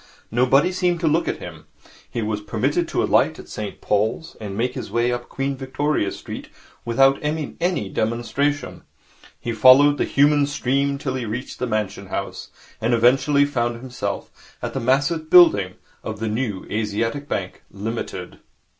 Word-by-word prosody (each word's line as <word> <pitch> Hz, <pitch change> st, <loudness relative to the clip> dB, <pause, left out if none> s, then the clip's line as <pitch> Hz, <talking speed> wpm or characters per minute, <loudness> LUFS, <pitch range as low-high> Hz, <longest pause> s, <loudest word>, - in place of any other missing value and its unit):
Nobody 130 Hz, +8 st, +3 dB
seemed 180 Hz, -2 st, 0 dB
to 165 Hz, -, +1 dB
look 160 Hz, +3 st, +2 dB
at -, -, -1 dB
him. 80 Hz, -3 st, -10 dB, 0.4 s
He 115 Hz, -, -3 dB
was 105 Hz, -1 st, -2 dB
permitted 135 Hz, +11 st, 0 dB
to -, -, 0 dB
alight -, -, +3 dB
at -, -, -11 dB
St 105 Hz, -2 st, -6 dB
Paul's 110 Hz, +9 st, -1 dB
and 100 Hz, -2 st, -5 dB
make 125 Hz, +2 st, 0 dB
his -, -, -6 dB
way 120 Hz, +1 st, +1 dB
up 120 Hz, 0 st, -4 dB
Queen 135 Hz, 0 st, -2 dB
Victoria 135 Hz, -4 st, -1 dB
Street -, -, -8 dB, 0.3 s
without 135 Hz, +3 st, +3 dB
any 150 Hz, 0 st, -3 dB, 0.3 s
demonstration. 120 Hz, +7 st, -1 dB, 0.6 s
He 120 Hz, -, -3 dB
followed 130 Hz, +6 st, +6 dB
the -, -, +2 dB
human 145 Hz, 0 st, +3 dB
stream 140 Hz, 0 st, 0 dB
till 135 Hz, -2 st, -3 dB
he 130 Hz, -2 st, -3 dB
reached 115 Hz, +4 st, -5 dB
the 125 Hz, -, -1 dB
Mansion 105 Hz, -3 st, -2 dB
House, -, -, -5 dB, 0.3 s
and 120 Hz, +2 st, +2 dB
eventually 135 Hz, +5 st, +4 dB
found 120 Hz, -4 st, -1 dB
himself 125 Hz, 0 st, -6 dB
at -, -, -4 dB
the -, -, -2 dB
massive 145 Hz, +6 st, +1 dB
building 100 Hz, -, +6 dB, 0.3 s
of 110 Hz, -1 st, -5 dB
the 110 Hz, 0 st, -2 dB
New 110 Hz, -3 st, -2 dB
Asiatic 115 Hz, +6 st, -2 dB
Bank, 95 Hz, -8 st, -4 dB
Limited. 110 Hz, +4 st, -5 dB
125 Hz, 160 wpm, -22 LUFS, 110-145 Hz, 0.6 s, followed